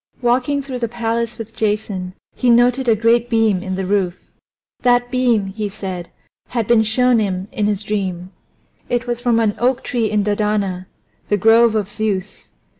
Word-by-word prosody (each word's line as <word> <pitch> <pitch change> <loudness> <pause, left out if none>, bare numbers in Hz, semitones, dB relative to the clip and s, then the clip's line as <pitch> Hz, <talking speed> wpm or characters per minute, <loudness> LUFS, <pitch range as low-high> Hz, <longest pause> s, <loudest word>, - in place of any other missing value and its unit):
Walking 255 +4 +1
through 260 -2 -5
the 235 - -1
palace 230 0 -2
with 225 0 -8
Jason 205 -4 -2 0.2
he 250 - 0
noted 245 +2 +4
a 225 - +5
great 230 +2 +2
beam 225 -5 +2
in 185 0 -4
the 190 0 -3
roof. 190 -2 0 0.6
That 245 0 +2
beam, 245 -5 +2
he 205 +2 -4
said, 190 -4 -6 0.4
had 235 -3 -2
been 235 0 +4
shown 240 +2 +3
him 190 -2 -2
in 215 -6 -1
his 210 -1 -1
dream; 190 -4 -3 0.6
it 245 0 0
was 240 -1 -3
from 240 -2 +2
an 220 -2 +2
oak 255 +1 +1
tree 230 -3 -1
in 210 -1 +1
Dodona, 205 -3 -1 0.4
the 205 - +2
grove 225 +2 +5
of 210 -3 0
Zeus. 210 -2 -4
220 Hz, 175 wpm, -19 LUFS, 200-240 Hz, 0.6 s, a